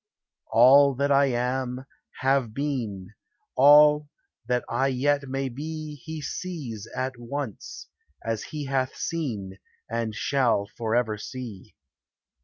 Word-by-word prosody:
All 135 +4 +6
that 140 +2 0
I 140 0 +5
am, 125 +1 -2 0.4
have 130 -4 +1
been, 115 -10 -3 0.4
All 150 +2 +7 0.4
that 125 0 0
I 135 - +1
yet 140 +1 0
may 135 0 -1
be, 155 +4 -6
He 160 -1 -6
sees 140 - -5
at 130 -1 -3
once, 125 -2 -6 0.4
as 115 -1 -2
he 150 -2 -5
hath 135 -1 -1
seen, 105 -13 -4 0.3
And 115 -2 -3
shall 120 -6 +1
forever 115 -1 0
see. 120 -6 -8
130 Hz, 115 wpm, -26 LUFS, 115-145 Hz, 0.4 s, All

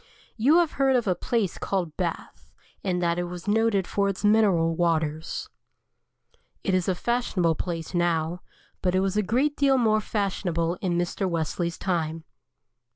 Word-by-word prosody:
You 270 +9 +4
have 345 -3 +3
heard 270 -1 +4
of 240 -2 +2
a 190 - +2
place 200 +1 -1
called 175 -6 -2
Bath, 175 -3 -5 0.3
and 180 -2 -1
that 170 0 +1
it 175 - -2
is 180 +2 -8
noted 210 -2 +2
for 200 +1 0
its 195 +1 -3
mineral 195 -7 +3
waters. 160 -2 -1 1.2
It 195 - 0
is 185 -2 +1
a 190 - +1
fashionable 195 -6 0
place 165 +1 -5
now, 175 0 0 0.4
but 180 -1 +1
it 185 - +3
was 195 0 0
a 210 - +3
great 260 +9 +1
deal 275 -2 +3
more 215 -3 +3
fashionable 180 -5 -1
in 175 -3 0
Mr. 175 +2 -1
Wesley's 170 +1 -2
time. 165 -3 -2
185 Hz, 160 wpm, -26 LUFS, 170-215 Hz, 1.2 s, You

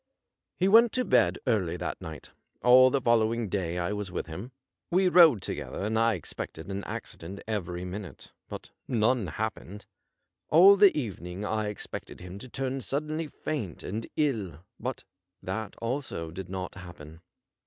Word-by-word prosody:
He 185 - +2
went 225 +3 +7
to 255 -1 +1
bed 95 - +3
early 95 -8 +1
that - - -4
night 80 -2 -9 0.3
All 130 +1 +8
the 140 - +1
following 115 -2 +2
day 90 -3 -2
I 90 +3 -1
was 105 -2 -4
with - - -3
him. 95 +10 -7 0.4
We 185 +2 +3
rode 165 - +7
together, - - -4
and 110 +1 +1
I 115 -1 +3
ex 85 - -7
pected 80 +4 -7
an 100 0 -4
accident 95 +5 -7
every 90 -5 -3
minute, 90 -4 -8 0.2
but - - -8 0.2
none 120 -2 +2
happened. 105 +2 -5 0.6
All 185 +6 +8
the 200 -4 +6
even 105 - -4
ing 90 +4 -5
I 110 0 -1
expected 105 - -6
him 90 +2 -9
to 130 - -9
turn 135 +1 -2
suddenly 150 +5 -2
faint 135 - -5
and 110 +4 -4
ill, 105 - -1 0.2
but 130 0 -4 0.4
that 100 +3 -4
also 115 - -4
did 90 +2 -7
not 95 0 -4
happen. 85 -3 -11
105 Hz, 165 wpm, -28 LUFS, 90-130 Hz, 0.6 s, All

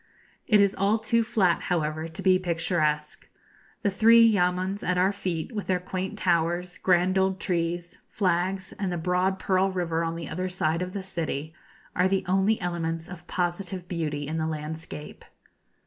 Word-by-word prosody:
It 210 -3 +5
is 200 -1 +4
all 200 +3 +2
too 230 +1 +2
flat, 190 -6 +2
however, 155 -2 -1
to 160 - -8
be 185 -1 +5
picturesque. 165 -4 -1 0.5
The 200 - +2
three 230 +3 +6
yamuns 185 -1 +1
at 180 0 0
our 185 +2 +3
feet, 185 -2 -3
with 210 -3 -4
their 185 -1 +1
quaint 185 +3 -4
towers, 175 0 0
grand 185 +1 +3
old 190 0 +1
trees, 175 -2 -2
flags, 190 0 0
and 195 -3 -1
the 175 - -2
broad 180 +3 +1
Pearl 190 0 +1
River 170 -3 -1
on 165 0 -2
the 165 -3 -6
other 185 +4 -3
side 165 -2 0
of 180 0 -4
the 200 - -4
city, 160 -4 -4 0.4
are 180 +1 +3
the 195 0 0
only 195 +4 +2
elements 165 -2 -3
of 175 -1 -10
positive 180 0 -2
beauty 150 -5 -3
in 160 +2 -2
the 160 - 0
landscape. 155 0 -6
180 Hz, 170 wpm, -26 LUFS, 165-190 Hz, 0.5 s, three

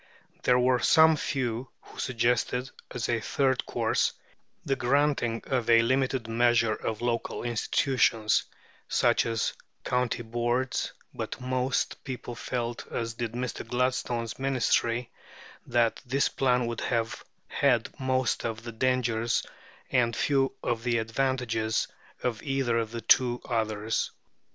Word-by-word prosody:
There 125 - +4
were 125 0 +3
some 160 +3 +6
few 130 -4 -2
who - - -14
suggested, 125 +1 0 0.2
as 125 -2 -3
a 115 -1 +1
third 130 +3 0
course, - - +1 0.5
the 135 - +1
granting 130 -2 +1
of 125 -4 -1
a 115 0 +7
limited 130 -1 +1
measure 115 -1 +3
of 110 0 -4
local 120 -1 -1
institutions, 115 -1 +2 0.4
such - - +3
as 115 -1 0 0.3
county 125 -2 0
boards; 120 +3 -1 0.2
but - - -5
most 130 +1 -1
people 125 -3 -6
felt, 120 0 -4
as 115 -1 -2
did 115 -1 -4
Mr. 125 0 -3
Gladstone's 120 -1 -1
Ministry, 125 -3 +1 0.6
that 115 -2 +2
this 135 +2 +1
plan 125 -2 +2
would 115 -1 -3
have 115 -2 -1 0.2
had 125 -5 +1
most 130 -3 0
of 115 -1 -3
the 120 - -6
dangers 120 -1 +1 0.5
and 120 -2 +2
few 135 -2 +2
of 115 -1 -1
the 120 0 +1
advantages 115 -1 0 0.4
of 120 -4 -1
either 135 -4 0
of 115 -1 -2
the 115 0 -5
two 120 +2 +4
others. 110 -2 -1
120 Hz, 130 wpm, -28 LUFS, 115-130 Hz, 0.6 s, a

